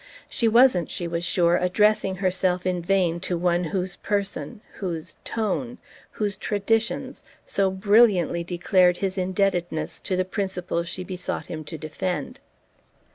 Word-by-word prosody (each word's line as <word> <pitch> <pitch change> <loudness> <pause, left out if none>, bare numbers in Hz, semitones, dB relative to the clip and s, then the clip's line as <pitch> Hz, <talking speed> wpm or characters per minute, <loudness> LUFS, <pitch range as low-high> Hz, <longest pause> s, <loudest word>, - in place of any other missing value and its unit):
She 230 - 0
wasn't, 230 -7 +5
she 175 - -4
was 170 0 -2
sure, 175 -1 +3
addressing 190 +2 +2
herself 185 -1 0
in 180 -1 0
vain 175 -2 +1
to 180 0 -2
one 175 0 +1
whose 180 +2 -3
person, 205 +2 -3 0.2
whose 170 -4 -4
"tone," 230 +3 -2 0.4
whose 205 -2 -2
traditions 220 +2 -1 0.2
so 195 -1 +1
brilliantly 190 -3 +3
declared 180 +1 +3
his 195 -1 -2
indebtedness 185 -3 -1
to 185 - -2
the 185 0 +1
principles 185 -3 -3
she 185 - -5
besought 180 -1 -4
him 155 -2 -6
to 160 +2 -6
defend. 155 +1 -4
185 Hz, 135 wpm, -25 LUFS, 175-200 Hz, 0.4 s, wasn't